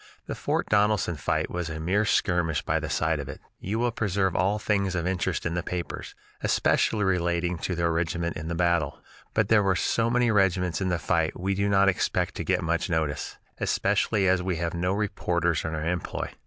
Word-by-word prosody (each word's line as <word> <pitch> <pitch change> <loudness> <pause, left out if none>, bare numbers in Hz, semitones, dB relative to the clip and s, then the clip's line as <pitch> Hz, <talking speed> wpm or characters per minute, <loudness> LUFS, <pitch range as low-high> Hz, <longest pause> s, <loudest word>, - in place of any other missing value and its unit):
The - - -4
Fort - - -1
Donelson 105 -4 +2
fight 75 - -1
was 90 -2 -3
a 80 0 -5
mere 95 +7 +1
skirmish 90 -6 +1
by - - 0
the - - -5
side 80 -1 0
of 70 -1 -6
it. - - -7 0.2
You 105 +4 -3
will 120 +1 +1
preserve 100 -4 0
all 100 +3 +2
things 100 -3 0
of 85 -2 -1
interest 90 -1 -1
in 85 - -1
the 85 - -1
papers, 90 0 -5 0.3
especially 105 -2 +2
relating 85 -2 0
to 90 0 -3
our 85 -1 +2
regiment 85 +1 -1
in 80 - -5
the 85 - -2
battle; 80 -6 +1 0.4
but 110 -2 +2
there 110 -2 +5
were 95 -2 +2
so 115 +5 +1
many 120 -1 +2
regiments 90 -4 +2
in 95 - 0
the 90 - +1
fight 85 0 0
we 95 +2 0
do 100 +1 0
not 100 -1 +4
expect 95 - +1
to - - -2
get - - 0
much 85 +2 0
notice, 80 -4 -2 0.2
especially 100 -3 +1
as 95 0 +3
we 90 -1 -1
have 85 +1 -2
no 90 +2 0
reporters 90 -5 0
in 80 0 -3
our 75 0 -3
employ. 85 +1 -3
90 Hz, 210 wpm, -26 LUFS, 85-100 Hz, 0.4 s, there